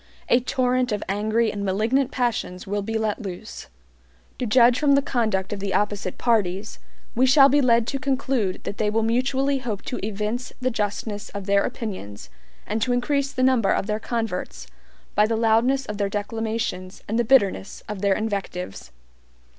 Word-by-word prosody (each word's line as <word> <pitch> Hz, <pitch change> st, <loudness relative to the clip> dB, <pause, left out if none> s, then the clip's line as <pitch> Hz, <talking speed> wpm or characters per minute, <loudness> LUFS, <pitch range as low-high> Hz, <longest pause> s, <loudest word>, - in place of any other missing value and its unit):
A 240 Hz, -, +5 dB
torrent 255 Hz, 0 st, 0 dB
of 210 Hz, -, -1 dB
angry 215 Hz, +3 st, +1 dB
and 200 Hz, -1 st, -4 dB
malignant 225 Hz, +8 st, +1 dB
passions 235 Hz, -9 st, -2 dB
will 205 Hz, +1 st, -2 dB
be 225 Hz, +2 st, -2 dB
let 220 Hz, +1 st, -1 dB
loose. 175 Hz, -, -7 dB, 0.7 s
To 250 Hz, -, -1 dB
judge 240 Hz, +2 st, +5 dB
from 290 Hz, -2 st, +4 dB
the 280 Hz, -, +4 dB
conduct 215 Hz, -8 st, 0 dB
of 205 Hz, -, -5 dB
the 195 Hz, 0 st, -2 dB
opposite 205 Hz, -3 st, -1 dB
parties, 210 Hz, -3 st, 0 dB, 0.3 s
we 255 Hz, +3 st, +3 dB
shall 275 Hz, +1 st, +7 dB
be 290 Hz, +2 st, +4 dB
led 235 Hz, -3 st, +4 dB
to 275 Hz, +3 st, -3 dB
conclude 260 Hz, -8 st, -1 dB
that 200 Hz, -, -6 dB
they 210 Hz, -, +2 dB
will 225 Hz, +1 st, +1 dB
mutually 265 Hz, +4 st, +1 dB
hope 225 Hz, -6 st, -4 dB
to 250 Hz, -, -5 dB
evince 215 Hz, +4 st, -3 dB
the 255 Hz, 0 st, 0 dB
justness 205 Hz, -1 st, -3 dB
of 200 Hz, -1 st, -5 dB
their 200 Hz, 0 st, +3 dB
opinions, 105 Hz, -, -6 dB, 0.3 s
and 215 Hz, +2 st, -2 dB
to 245 Hz, +3 st, +1 dB
increase 275 Hz, +3 st, 0 dB
the 255 Hz, -, -1 dB
number 255 Hz, -6 st, +3 dB
of -, -, +1 dB
their 210 Hz, +1 st, -1 dB
converts 180 Hz, -, -3 dB, 0.5 s
by 210 Hz, +1 st, +4 dB
the 225 Hz, 0 st, 0 dB
loudness 230 Hz, +4 st, +2 dB
of 210 Hz, 0 st, -6 dB
their 200 Hz, -1 st, +1 dB
declamations 205 Hz, -2 st, -3 dB
and 225 Hz, +3 st, 0 dB
the -, -, +3 dB
bitterness 200 Hz, -, +2 dB
of 210 Hz, -3 st, -5 dB
their 200 Hz, -1 st, +3 dB
invectives. 195 Hz, -, -4 dB
220 Hz, 180 wpm, -24 LUFS, 200-250 Hz, 0.7 s, shall